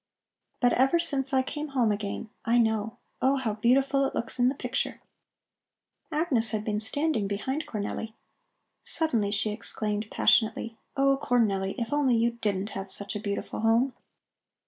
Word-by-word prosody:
But 245 -1 +4
ever 265 +6 +4
since 280 -5 0
I 260 -1 +3
came 295 +3 -4
home 230 -4 +4
again, 205 +1 -4
I 235 +1 +3
know. 220 0 +1 0.2
Oh, 265 +2 +4
how 250 -6 -1
beautiful 270 +5 +3
it 270 - -1
looks 235 - -3
in 245 +1 +5
the 270 - -3
picture!" - - -2 1.1
Agnes 295 -8 +1
had 215 -1 -2
been 210 -1 0
standing 220 0 0
behind 265 +10 -2
Cornelli. 220 0 -4 0.7
Suddenly 235 -11 0
she 210 +1 0
exclaimed 210 -1 -2
passionately: 225 0 +2 0.2
"Oh, 275 0 +3
Cornelli, 200 -7 +1
if 235 +2 -2
only 280 -4 +3
you 230 +1 +2
didn't 205 -4 -2
have 195 -1 -6
such 200 +2 -5
a - - -2
beautiful 200 -1 -4
home!" 230 +4 +3
230 Hz, 155 wpm, -28 LUFS, 210-270 Hz, 1.1 s, in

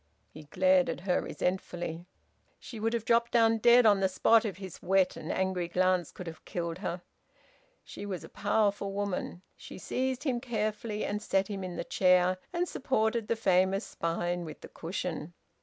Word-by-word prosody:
He 155 0 -12
glared 185 +3 +3
at - - -4
her 180 -1 +1
resentfully. 175 -2 -3 0.5
She 230 - -9
would 225 +2 0
have 230 -2 -2
dropped 235 0 +3
down 225 -1 +4
dead 240 +1 +6
on 205 -2 +6
the 190 -1 +2
spot 225 +4 +4
if 195 -4 -3
his 190 -2 -9
wet 190 0 +2
and - - -5
angry 185 -2 -1
glance 180 -1 +1
could 180 - -9
have 165 -1 -9
killed 170 -1 -4
her. 175 -2 -4 0.8
She 205 - -8
was 185 -3 -4
a - - -9
powerful 205 -1 0
woman. 195 -2 -3
She - - -11
seized 260 +6 -2
him 260 -5 0
carefully 215 -3 -2
and 205 +1 -2
set 195 -1 0
him 195 -2 -4
in 180 -1 -5
the - - -3
chair, 180 0 +3
and 355 0 -1
supported 225 -6 0
the 230 - +1
famous 190 -1 +2
spine 175 +1 -2
with 155 -2 -9
the - - -10
cushion. 175 -1 -5
195 Hz, 180 wpm, -30 LUFS, 180-220 Hz, 0.8 s, dead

